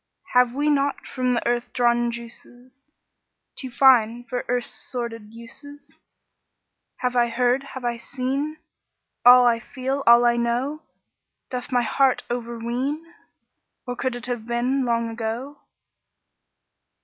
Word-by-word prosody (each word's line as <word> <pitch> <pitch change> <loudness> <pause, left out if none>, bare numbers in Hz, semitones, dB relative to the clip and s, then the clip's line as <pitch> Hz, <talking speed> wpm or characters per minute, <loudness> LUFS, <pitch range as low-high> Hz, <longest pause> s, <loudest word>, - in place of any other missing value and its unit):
Have 250 0 +4
we 290 +2 0
not 280 0 0
from 255 -1 -1
the 240 - -1
earth 240 0 -1
drawn 240 -1 +2
juices 245 +3 -11 0.7
Too 260 - -6
fine 240 -2 +4
for 245 0 -4
earth's 245 -1 -1 0.2
sordid 230 -4 -5
uses? 285 +5 -12 1.1
Have 250 -1 -1
I 240 -1 +4
heard, 245 +2 +1
have 260 -2 -8
I 240 -1 -1
seen 275 +5 -3 0.7
All 245 0 +8
I 235 -1 +3
feel, 265 +3 -4
all 235 +1 +7
I 240 0 +3
know? 245 +6 -1 0.7
Doth 250 0 -5
my 245 -1 +2
heart 265 +3 +2
overween? 245 +7 -3 0.7
Or 245 - -4
could 255 0 -2
it 245 - -5
have 240 -2 -4
been 250 +3 0
Long 235 -1 0
ago?" 230 +5 -5
245 Hz, 130 wpm, -23 LUFS, 235-265 Hz, 1.1 s, All